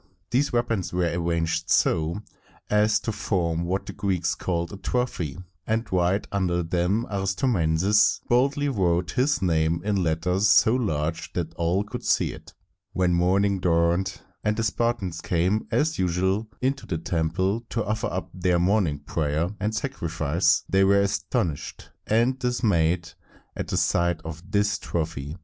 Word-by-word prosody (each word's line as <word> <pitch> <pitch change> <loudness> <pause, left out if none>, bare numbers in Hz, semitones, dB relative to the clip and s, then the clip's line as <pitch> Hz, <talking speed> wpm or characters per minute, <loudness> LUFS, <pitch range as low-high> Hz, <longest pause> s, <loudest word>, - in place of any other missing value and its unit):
These 135 +4 +2
weapons 115 -6 0
were 90 -1 0
arranged 85 -1 -1
so 80 +6 +2 0.5
as 105 +1 +3
to 115 - -2
form 85 -5 -1
what 95 +3 -2
the - - -7
Greeks 95 -4 -1
called 85 -1 -3
a - - -6
trophy, 95 - -2 0.3
and 110 +1 0
right 90 +2 +2
under 90 -3 0
them 90 +7 0
Aristomenes 95 - +2
boldly 140 +4 +2
wrote 90 - +1
his 135 -3 +1
name 80 -1 +2
in 100 -2 +1
letters 90 +4 +1
so 110 +1 +5
large 80 -10 -1
that 85 -2 -3
all 85 +4 0
could 105 - -7
see - - +1
it. - - -13 0.4
When 90 -1 +2
morning 95 +3 +2
dawned, 85 +2 +1 0.2
and 105 0 0
the 115 - 0
Spartans 105 -5 -1
came 90 +5 0
as 155 +2 0
usual 95 +4 0
into 135 +2 -1
the 85 - -2
temple 90 +6 -1
to 115 -3 -2
offer 110 +1 -1
up 90 +2 -4
their 90 -1 +1
morning 90 -5 +1
prayer 80 +3 -1
and 105 +2 -1
sacrifice, 85 - 0
they 95 0 +3
were 100 +1 +5
astonished 85 -5 -2 0.2
and 120 +4 +2
dismayed 90 -9 +1 0.4
at - - -4
the - - -2
sight 85 -1 +1
of 80 0 -6
this 105 +1 +1
trophy. 80 -2 -4
90 Hz, 150 wpm, -25 LUFS, 85-105 Hz, 0.5 s, so